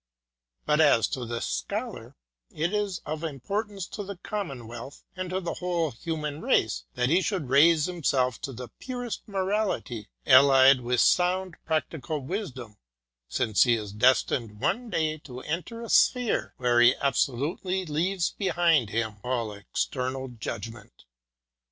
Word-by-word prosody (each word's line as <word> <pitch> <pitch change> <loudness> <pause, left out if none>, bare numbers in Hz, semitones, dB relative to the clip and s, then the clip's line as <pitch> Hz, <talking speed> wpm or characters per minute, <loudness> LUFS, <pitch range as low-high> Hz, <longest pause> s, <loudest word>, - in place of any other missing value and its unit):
But 150 +1 +3
as 140 -7 +5
for 125 -3 -4
the 115 0 -3
Scholar, - - -4 0.3
it 165 +6 -2
is 205 -4 -1
of 155 +1 -4
importance 195 - -3
to 205 - -5
the 200 0 -7
commonwealth 135 - -6
and 185 -1 -4
to 185 +1 -1
the 175 -3 -3
whole 175 -4 -1
human 150 +3 -4
race 60 0 +1
that 125 - +1
he 175 +5 +4
should 185 - -2
raise 150 +3 +5
himself 135 -8 0
to 145 -5 -4
the 125 -1 -8
purest 245 -3 -5
morality, 190 - -2 0.2
allied 135 0 +7
with 125 0 +1
sound 180 0 +2
prac 160 -1 +1
tical 155 0 -4
wisdom, 130 - -6 0.5
since 105 - +1
he 120 -2 +5
is 105 -3 -5
destined 115 -1 +2
one 245 - -1
day 155 -4 -1
to 130 -3 -9
enter 180 - -4
a 230 - -7
sphere 250 -3 +2
where 120 -1 +3
he 120 +2 +6
absolutely 145 +8 -1
leaves 170 +4 0
behind 170 - +2
him 110 -1 -2
all 120 -4 -2
external 130 +5 -3
judg 115 -1 -5
ment. 110 - -17
150 Hz, 145 wpm, -27 LUFS, 125-180 Hz, 0.5 s, allied